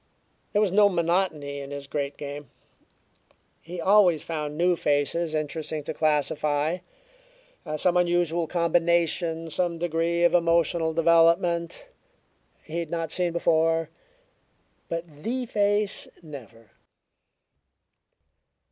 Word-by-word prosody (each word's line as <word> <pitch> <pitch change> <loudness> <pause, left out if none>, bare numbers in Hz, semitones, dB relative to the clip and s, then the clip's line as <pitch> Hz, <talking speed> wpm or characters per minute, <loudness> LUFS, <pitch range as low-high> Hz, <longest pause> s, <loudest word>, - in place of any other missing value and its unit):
There 205 - +2
was 200 - 0
no 205 +1 +5
monotony 170 -5 -1
in 140 0 -8
his 140 0 -6
great 140 0 -4
game. 145 0 -7 1.1
He 175 +2 -8
always 185 -3 +4
found 150 -2 -4
new 175 +1 +3
faces 155 +2 0
interesting 155 0 -3
to 160 - -5
classify, 150 +1 0 1.0
some 175 +3 +2
unusual 175 -1 +1
combination, 170 -1 +1
some 175 +1 -1
degree 170 0 0
of 175 - +4
emotional 170 -1 +2
development 170 +1 +2 0.8
he 160 +2 -5
had 165 -2 -4
not 165 -1 -3
seen 180 -2 +2
before. 165 -1 +1 1.0
But 165 -3 -6
the 250 +6 -2
face 205 -2 0 0.2
never. 115 -8 -12
165 Hz, 105 wpm, -25 LUFS, 155-175 Hz, 1.1 s, no